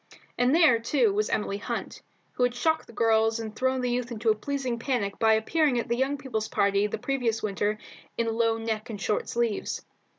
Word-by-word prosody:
And 250 +4 +3
there, 310 -9 +5
too, 230 -2 +2
was 210 +1 0
Emily 205 -1 -1
Hunt, - - -5 0.3
who - - -6
had 245 0 +2
shocked 315 +6 0
the - - -12
girls 225 0 +2
and 220 -1 -6
thrown 260 +2 0
the 250 -1 0
youth 245 0 -2
into 225 0 +1
a - - +1
pleasing 260 0 -3
panic 225 -6 -2
by 220 -1 +5
appearing 280 +4 +1
at 235 - -3
a - - +3
young 265 +3 0
people's 225 -6 -3
party 200 -1 +2
the - - -4
previous 245 -5 -1
winter 205 0 -1 0.4
in 235 - +1
low 225 0 +1
neck 225 +1 -3
and 210 -3 -5
short 210 - -1
sleeves. 235 -3 -2
230 Hz, 205 wpm, -27 LUFS, 215-250 Hz, 0.4 s, there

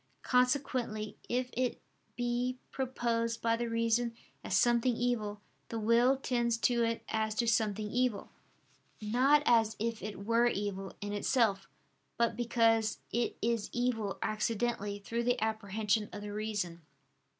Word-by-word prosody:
Consequently 250 -5 +1
if 250 +1 -1
it 250 0 -1 0.4
be 245 +1 -1
proposed 230 -3 -1
by 230 0 +2
the 235 0 -2
reason 230 +1 +1 0.3
as - - +1
something 240 0 +3
evil, 220 -4 -1 0.3
the 230 - -3
will 235 +4 +4
tends 240 -3 0
to 235 +1 +2
it 230 0 -1
as 220 -1 -1
to 235 - +1
something 215 -2 +1
evil: 245 -3 0 0.7
not 255 +7 +3
as 225 -2 +4
if 230 +1 -2
it 200 -1 -6
were 230 +2 +4
evil 195 -3 -3
in 205 0 -4
itself, 205 -2 +1 0.5
but 235 0 +2
because 225 -2 +2
it 235 +2 -1
is 230 -2 0
evil 235 -5 -1
accidentally, 215 -1 -1
through 230 +4 -3
the 245 +1 +1
apprehension 215 -1 0
of 205 - -7
the 205 0 -6
reason. 205 -5 -3
230 Hz, 140 wpm, -32 LUFS, 215-240 Hz, 0.7 s, will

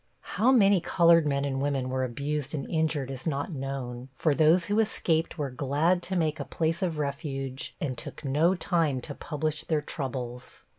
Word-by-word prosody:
How 245 +4 +2
many 200 -7 +5
colored 170 -2 +4
men 140 -1 0
and 135 -1 -2
women 140 -2 0
were 130 0 -1
abused 140 +4 -3
and 140 - -4
injured 155 -4 0
is 130 +3 -5
not 145 +3 -1
known, 130 -3 -5
for 155 +2 +2
those 160 +4 +4
who 205 +4 +1
escaped 170 -7 +1
were 145 -4 -2
glad 145 +7 +1
to 190 +2 -4
make 160 -3 0
a - - -2
place 165 +3 -1
of 170 -4 -1
refuge 135 -2 -4
and 135 -4 -2
took 145 - -8
no 155 +7 +3
time 165 -7 +1
to - - -6
publish 155 0 -3
their 155 -2 0
troubles. 125 -4 -5
150 Hz, 185 wpm, -28 LUFS, 135-165 Hz, -, many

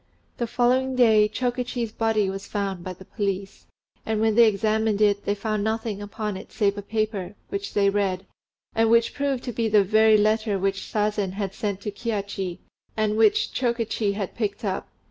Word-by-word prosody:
The 235 - -1
following 255 +2 +1
day, 220 -4 +5
Chokichi's 245 -1 -2
body 220 -2 +1
was 195 +1 -5
found 195 -4 -3
by 185 - -5
the 190 +1 -14
police; 195 -2 -4 0.4
and 220 -1 -1
when 220 0 +3
they 230 +1 +7
examined 215 0 +1
it, 205 -1 +2
they 205 - +1
found 215 0 -2
nothing 220 -1 -2
upon 205 0 -4
it - - -11
save 200 -3 +1
a 205 - -5
paper, 210 -2 -2
which 200 0 -5
they 200 -1 +4
read, 195 -2 0 0.5
and 225 0 +3
which 230 0 +4
proved 280 -3 -1
to 245 - -4
be 230 +1 0
the 210 -1 +5
very 215 +2 +5
letter 215 0 +2
which 195 +1 -2
Sazen 210 -3 0
had 195 -1 -3
sent 200 -3 -3
to 210 - -4
Kihachi, 200 -4 -3 0.4
and 215 -1 +1
which 220 -1 +3
Chokichi 230 -4 0
had 200 -2 -4
picked 215 0 -3
up. 190 -2 -2
210 Hz, 185 wpm, -25 LUFS, 200-225 Hz, 0.5 s, they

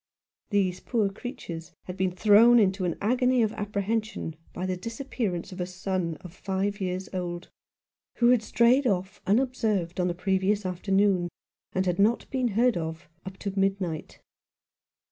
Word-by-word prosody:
These 190 -3 +1
poor 215 -3 0
creatures 180 -7 -7
had 180 - -7
been 190 -1 +1
thrown 215 +5 +6
into 190 -3 +3
an 175 - -1
agony 250 +3 +3
of 220 - 0
apprehension 210 -3 -2 0.2
by 180 - -4
the 185 -1 -1
disappearance 225 -3 -4
of 185 0 -6
a 180 - -2
son 180 -3 -2
of 180 -2 -10
five 195 +2 -2
years 185 0 -2
old, 175 -1 -4 0.6
who 240 0 +4
had 250 -3 +5
strayed 240 +4 +3
off 190 -3 -1
unobserved 215 -6 +1
on 180 - +2
the 175 - -1
previous 190 +2 +1
afternoon, 185 0 +1 0.4
and 185 0 +1
had 180 +1 0
not 220 +4 +3
been 255 -2 +1
heard 240 -3 +4
of 160 0 -5 0.2
up 190 0 -7
to 200 -1 -4
midnight. 195 -5 -1
195 Hz, 155 wpm, -27 LUFS, 180-220 Hz, 0.6 s, thrown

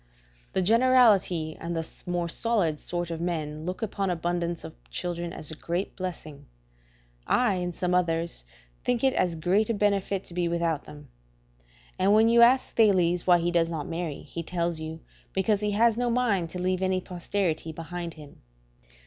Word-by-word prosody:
The 190 - +1
generality 215 -8 +4
and 170 0 -3 0.3
more 175 -1 -1
solid 175 -5 0
sort 175 -1 -3
of 165 0 -4
men 155 -3 -3
look 185 +5 -4
upon 200 -2 -1
abundance 175 0 -2
of - - -8 0.2
children 170 - -3
as 155 - -7
a - - -6
great 175 +5 -3
blessing; 160 -6 -6 0.8
I, 245 -5 +3
and 180 -1 -3
some 180 -1 -1
others, 170 - 0 0.4
think 245 -1 0
it 265 -1 +4
as 175 -2 +1
great 185 +7 +1
a 230 - +1
benefit 200 -1 0
to - - -10
be 175 0 0
without 170 -3 -1
them. 145 -2 -12 0.9
And 195 +3 +4
when 220 +1 +5
you 235 0 +5
ask 250 +3 +4
Thales 180 -6 +3
why 175 -1 +7
he 175 0 0
does 170 -1 +2
not 160 -4 -4
marry, 165 -3 -4
he 170 - -6
tells 170 -1 -2
you, 160 +1 -6 0.3
because 200 +2 +1
he 210 - 0
has 225 +1 +3
no 245 0 +1
mind 225 -8 +1
to 180 - -6
leave 185 +1 0
any 185 0 +1
posterity 175 -2 -2
behind 170 +1 -6
him. 150 -2 -14
175 Hz, 175 wpm, -27 LUFS, 165-200 Hz, 0.9 s, why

